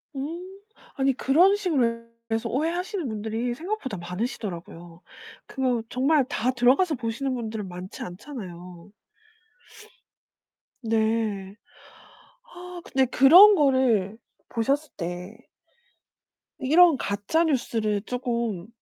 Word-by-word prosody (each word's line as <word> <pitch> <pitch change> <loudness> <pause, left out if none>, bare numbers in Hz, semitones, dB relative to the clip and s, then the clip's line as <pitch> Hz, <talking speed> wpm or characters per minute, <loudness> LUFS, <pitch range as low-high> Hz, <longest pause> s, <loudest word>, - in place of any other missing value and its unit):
음. 345 +8 -6 0.4
아니 270 0 +2
그런 330 +10 +4
식으로 255 - 0 0.3
해서 225 0 -1
오해하시는 345 - -2
분들이 220 +3 -3
생각보다 320 - -4
많으시더라고요. 175 -3 -6 0.4
그거 255 -4 -1
정말 275 +3 +2
다 250 0 -1
들어가서 265 +7 +3
보시는 240 +3 -3
분들은 220 -4 -5
많지 180 +1 -8
않잖아요. 180 - -10 1.9
네. 220 -3 -1 0.9
아 360 -7 -10
근데 265 -1 +1
그런 345 - +8
거를 255 - +2 0.3
보셨을 275 +6 -1
때 180 +3 -6 1.2
이런 315 +3 +5
가짜 205 +10 0
뉴스를 225 -8 0
쪼금 235 -7 -3
245 Hz, 225 characters per minute, -25 LUFS, 210-295 Hz, 1.9 s, 그런